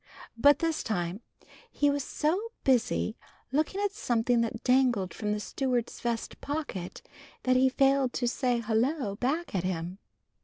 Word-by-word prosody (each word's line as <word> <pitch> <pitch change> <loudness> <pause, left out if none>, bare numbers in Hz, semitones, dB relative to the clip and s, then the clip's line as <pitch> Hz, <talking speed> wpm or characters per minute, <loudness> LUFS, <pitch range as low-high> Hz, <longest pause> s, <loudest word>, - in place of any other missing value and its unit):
But 285 +4 +6
this 330 -1 0
time 180 -1 -2 0.5
he 290 0 +2
was 285 -1 -1
so 355 - -1
busy 245 -3 +2 0.4
looking 310 +8 0
at 410 -1 +1
something 240 - +1
that 230 0 -3
dangled 250 -7 +3
from 210 -1 -2
the 210 - 0
steward's 245 +1 -2
vest 235 -1 -3
pocket 285 - -4 0.4
that 255 0 +3
he 260 +1 +5
failed 270 -1 +3
to 245 - 0
say 245 -1 0
"Hullo" 230 0 0
back 305 +7 -1
at 185 -3 0
him. 180 +1 -3
250 Hz, 150 wpm, -29 LUFS, 220-285 Hz, 0.5 s, But